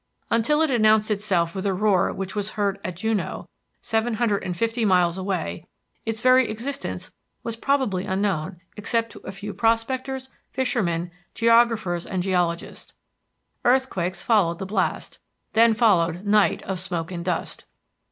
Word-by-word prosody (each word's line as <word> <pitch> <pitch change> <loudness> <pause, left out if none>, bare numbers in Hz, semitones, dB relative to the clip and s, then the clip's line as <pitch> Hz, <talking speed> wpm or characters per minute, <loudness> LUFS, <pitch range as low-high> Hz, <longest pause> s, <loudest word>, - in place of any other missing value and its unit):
Until 295 +7 +3
it 315 - +1
announced 215 -2 +4
itself 190 -5 +1
with 190 -1 -4
a 190 - +1
roar 200 -2 +2
which 195 +1 -5
was 205 0 -3
heard 200 -1 0
at 185 - -4
Juneau, 220 +2 -2 0.3
seven 225 0 0
hundred 215 -3 0
and 180 -1 -4
fifty 230 +2 0
miles 180 -4 +3
away, 185 -3 -3 0.4
its 225 0 -2
very 255 -1 +5
existence 265 +6 -4 0.3
was 230 -1 -3
probably 230 -7 0
unknown 190 -4 -1
except 230 +2 -1
to - - -11
a - - -8
few 200 +1 -7
prospectors, 260 +4 0 0.2
fishermen, 180 -10 -1 0.2
geographers, 230 -7 +3
and 185 -2 -2
geologists. 175 -3 -2 0.7
Earthquakes 240 -8 +1
followed 195 -8 +3
the 190 - -5
blast, 200 +3 -2 0.3
then 225 0 +5
followed 185 -5 +2
night 210 0 +3
of 190 -1 -3
smoke 175 -2 -3
and 170 -2 -4
dust. 175 -2 -3
210 Hz, 145 wpm, -24 LUFS, 185-230 Hz, 0.7 s, very